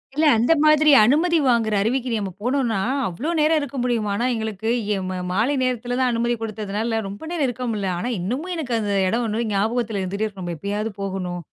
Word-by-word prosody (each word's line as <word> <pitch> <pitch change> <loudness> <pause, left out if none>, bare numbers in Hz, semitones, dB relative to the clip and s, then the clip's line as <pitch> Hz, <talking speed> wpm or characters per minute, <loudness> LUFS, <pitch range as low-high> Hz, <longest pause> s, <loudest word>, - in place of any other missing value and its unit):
இல்ல 310 +2 +2
அந்த 240 +8 +4
மாதிரி 305 0 +5
அனுமதி 320 +9 +3
வாங்குற 230 -3 +2
அருவிக்கு 250 +4 0
நம்ம 195 -2 -4
போனோன்னா, 245 -3 0 0.3
அவ்ளோ 215 - -4
நேரம் 310 +1 +3
இருக்க 285 -1 -5
முடியுமான்னா? 230 -2 0
எங்களுக்கு 220 -1 -3 0.3
எ - - -2
மா 185 - -3
மாலை 220 +9 +1
நேரத்தில 245 -1 -1
தான் 255 -1 +2
அனுமதி 235 +1 0
கொடுத்ததுனால, 220 +1 -2
ரொம்ப 200 +1 -8
நேரம் 330 -5 0
இருக்க 250 0 -4
முடில. 205 -3 -2
ஆனா, 240 - -2
இன்னமும் 260 - -3
எனக்கு 285 -7 -3
அந்த 205 -2 -2 0.2
எடம் 230 +6 0
1 225 +2 -1
ஞாபகத்தில 220 +1 0
இருந்துட்டே 200 +3 -2
இருக்கும். 200 -3 -7
நம்ம 175 -1 -4
எப்பயாவது 205 +6 -3
போகணும். 185 -2 -3
225 Hz, 185 wpm, -22 LUFS, 205-255 Hz, 0.3 s, மாதிரி